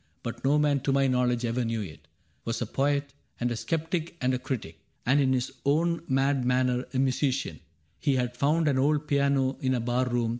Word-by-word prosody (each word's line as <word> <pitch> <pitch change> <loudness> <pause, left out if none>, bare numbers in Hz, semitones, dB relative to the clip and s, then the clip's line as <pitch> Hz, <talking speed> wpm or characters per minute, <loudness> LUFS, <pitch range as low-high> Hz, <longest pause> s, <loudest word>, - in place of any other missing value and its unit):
But 115 - -6
no 140 +3 +3
man 145 -2 +3
to 135 +1 -1
my 135 0 +3
knowledge 125 -2 +1
ever 120 +2 0
knew 115 -1 -1
it) 75 -4 -11 0.4
Was 115 0 -2
a 120 - -1
poet 140 +4 0 0.3
and 120 0 0
a - - -1
skeptic 165 +5 -2
and 130 +1 +1
a 130 - 0
critic, 115 - -5 0.3
And 135 +4 +4
in 135 -2 +3
his 130 -1 0
own 165 +4 +2
mad 135 0 +2
manner 125 0 +1
a 130 - -3
musician: 135 +1 0 0.4
He 140 -3 +1
had 125 -1 -1
found 155 +5 +2
an 135 -3 +2
old 150 +2 +2
piano 140 -2 +2
in 130 -1 +1
a - - 0
bar 120 +2 0
room. 120 -2 0
130 Hz, 210 wpm, -28 LUFS, 125-140 Hz, 0.4 s, And